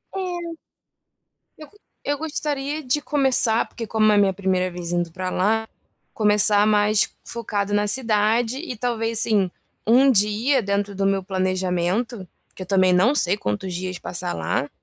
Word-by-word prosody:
É. 350 -3 -4 1.1
Eu 305 -1 -11
go 415 - -24 0.3
eu 290 0 -1
gostaria 295 -1 -3
de 260 +3 0
começar, 265 -6 +2
porque 230 - -7
como 215 0 +2
é 210 - +3
minha 195 -1 +3
1ª 185 -1 -1
vez 175 -1 -6
indo 175 -1 -1
pra 185 +2 -4
lá, 220 +5 0 0.5
começar 210 -1 +3
mais 210 0 +3 0.2
focado 205 -3 -3
na 205 0 +1
cidade 225 +1 +1
e 280 -4 -6
talvez, 230 -1 -1
assim, 200 -6 +2 0.3
1 255 +5 +5
dia 225 +4 +2
dentro 200 0 -2
do 195 - -1
meu 195 -1 +1
planejamento, 185 +3 -2 0.3
que 185 - -7
eu - - -11
também 185 -1 +3
não 190 +10 +4
sei 195 -8 +1
quantos 145 - -3
dias 185 +1 -4
passar 180 0 -4
lá, 85 - -2
210 Hz, 160 wpm, -22 LUFS, 185-245 Hz, 1.1 s, 1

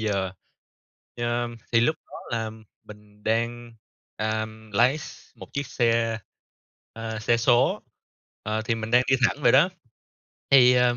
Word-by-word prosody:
giờ. 100 -4 -1 0.9
Ờ, 120 0 -1 0.2
thì 115 - +5
lúc 155 +7 +2
đó - - -9 0.2
là 110 -1 -3 0.3
mình 105 0 -15
đang, 115 +1 -1 0.4
ờm, 110 0 -3
lái 125 +9 +3
x - - -11
một - - -11
chiếc 140 0 -3
xe, 115 -3 +1 0.7
ờ, 110 -1 -5
xe 115 +2 +2
số, 120 +1 +3 0.6
ờ, 110 +1 -2
thì 115 +1 0
mình 110 0 -5
đang 125 +1 +5
đi - - +6
thẳng 145 - -6
vậy - - +5
đó, 150 +7 +6 0.8
thì, 125 -2 +7
ờ, 125 -1 +3
115 Hz, 150 wpm, -25 LUFS, 110-120 Hz, 0.9 s, thì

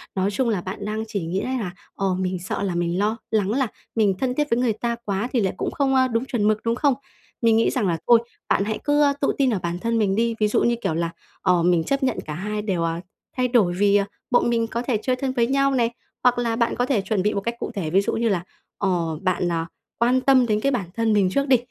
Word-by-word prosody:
Nói 195 +1 +1
chung 240 +3 0
là 200 -5 0
bạn 185 +2 -6
đang 215 +1 -2
chỉ 200 -6 -3
nghĩ 175 +4 -1
đấy 260 0 -2
là, 185 -5 -3 0.2
ồ, 195 -2 0
mình 185 -1 -1
sợ 185 +3 -3
là 190 -3 -1
mình 175 +1 0
lo 215 +2 +1
lắng 205 -2 +1
là 260 +1 +1 0.3
mình 205 -4 +3
thân 250 -1 0
thiết 295 -1 0
với 235 - +2
người 240 -3 +2
ta 235 +2 -2
quá 200 +3 -1
thì 245 - +3
lại 190 - 0
cũng - - -2
không, 270 -2 +1
ơ, 260 0 +4
đúng 230 +1 -1
chuẩn 220 -5 0
mực, 215 0 +1
đúng 230 0 +1
không? 280 +1 +3 0.5
Mình 225 -1 +4
nghĩ 225 - +3
rằng 240 -8 0
là 165 -2 0
thôi, 235 -1 +7 0.3
bạn - - +3
hãy 215 0 -2
cứ, 290 0 +2
ơ, 285 -1 +4
tự - - +2
tin 270 -2 +3
ở 195 - 0
bản 170 +1 -2
thân 230 +2 0
mình 195 -2 +2
đi. 230 +1 +1
Ví 215 - +3
dụ - - +1
như, 235 - +3
kiểu 160 - 0
là, 170 +1 -1 0.3
ờ, 180 -2 +3
mình 175 -2 +3
chấp 275 - -1
nhận 255 -2 +1
cả 150 - -5
hai 210 +5 -3
đều, 185 -5 -1
ờ, 165 0 -1 0.4
thay 250 0 +2
đổi 215 -8 +3
vì, 200 +2 +3
ờ, 200 -1 +3 0.3
bọn 245 0 +3
mình 230 -1 +1
có 235 +1 -3
thể 245 -3 0
chơi 255 +2 +1
thân 260 +1 -2
với 235 -2 +2
nhau 275 +1 +2
này, 235 -2 +2 0.3
hoặc 245 -1 +4
là 230 -2 0
bạn 235 0 +1
có 245 - +1
thể 250 -7 +1
chuẩn 195 0 -1
bị 210 - +1
một 200 - -1
cách 235 +3 -3
cụ - - -4
thể. 180 -6 -2
Ví 190 +5 +4
dụ - - -2
như 230 0 +1
là, 180 -3 0 0.3
ờ, 170 -5 0
bạn, 180 -1 0
ờ, 165 -1 -1 0.3
quan 250 +2 +3
tâm 260 -2 +5
đến 210 -2 +1
cái 275 +5 +1
bản 210 -8 -1
thân 225 -1 +1
mình 195 -3 +3
trước 275 +7 0
đi, 260 -2 +6
220 Hz, 285 wpm, -23 LUFS, 190-245 Hz, 0.5 s, thôi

